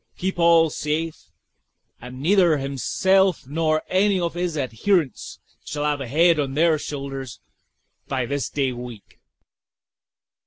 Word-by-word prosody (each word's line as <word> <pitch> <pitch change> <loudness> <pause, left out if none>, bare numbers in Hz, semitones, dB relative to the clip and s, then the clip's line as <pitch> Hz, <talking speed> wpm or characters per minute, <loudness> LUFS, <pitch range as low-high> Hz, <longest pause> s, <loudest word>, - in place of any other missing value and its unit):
Keep 190 -1 -3
all 165 -2 +5
safe, 155 +2 -3 0.7
and 125 +2 -9
neither 175 0 +3
himself 180 +7 +1
nor 155 +2 0
any 195 +1 +2
of 170 -1 -2
his 175 -2 -3
adherents 140 - -1 0.3
shall 145 +1 -4
have 145 -1 0
a 135 - -5
head 165 +5 +3
on 135 -2 -2
their 160 0 +3
shoulders 135 -4 -6 0.7
by 130 -3 -1
this 140 +3 -3
day 135 -3 -1
week." 120 -4 -10
150 Hz, 125 wpm, -23 LUFS, 135-170 Hz, 0.7 s, all